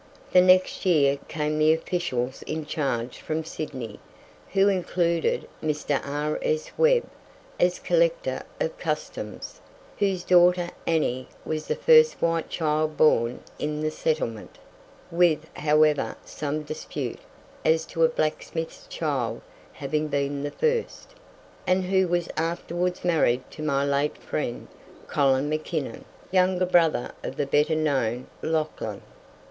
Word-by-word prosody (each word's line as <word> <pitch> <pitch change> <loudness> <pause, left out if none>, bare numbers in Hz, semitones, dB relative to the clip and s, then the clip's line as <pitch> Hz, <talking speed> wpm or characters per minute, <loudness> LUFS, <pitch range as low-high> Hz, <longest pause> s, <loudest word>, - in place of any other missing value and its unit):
The 180 - +8
next 185 0 +4
year 140 -6 +3
came 150 0 -1
the 155 +1 +5
officials 135 -7 -2
in 155 0 -3
charge 130 -6 -2
from 160 +1 -3
Sydney, 130 -9 -6 0.5
who 195 0 +5
included 175 -3 +1
Mr. 150 -2 -1
R.S. 150 - -2
Webb, 480 0 +4 0.6
as - - +3
Collector - - +1 0.2
of - - -2
Customs, - - -5 0.4
whose 195 -3 +1
daughter, 175 -1 +5 0.2
Annie, 130 -6 0 0.2
was 155 -1 -3
the - - 0
first 470 -1 +6
white 165 -1 0
child 155 -1 0
born 120 -5 +3 0.2
in 150 0 -2
the 155 0 0
settlement 135 -9 -2 0.5
(with, 165 -3 +3
however, 150 0 +3
some 150 +1 -3
dispute 155 +1 -5 0.4
as 160 0 +3
to 165 - -1
a 160 - +6
blacksmith's 160 +1 -3
child 140 -7 -2 0.3
having 150 +2 -2
been 140 -1 -1
the 145 - -2
first), 470 - -1 0.6
and 185 +1 +3
who 190 0 +2
was 175 -1 0
afterwards 175 +2 -2
married 140 -8 +2
to 155 - -9
my 140 -2 +1
late 140 +1 0
friend, 120 -5 -4 0.4
Colin 135 -1 +2
Mackinnon, 155 -4 -3 0.3
younger 185 0 +3
brother 165 -7 +3
of - - -5
the 145 - -1
better 150 +3 +2
known 130 -6 0 0.2
Lauchlan. 155 -1 -2
155 Hz, 125 wpm, -26 LUFS, 145-175 Hz, 0.6 s, The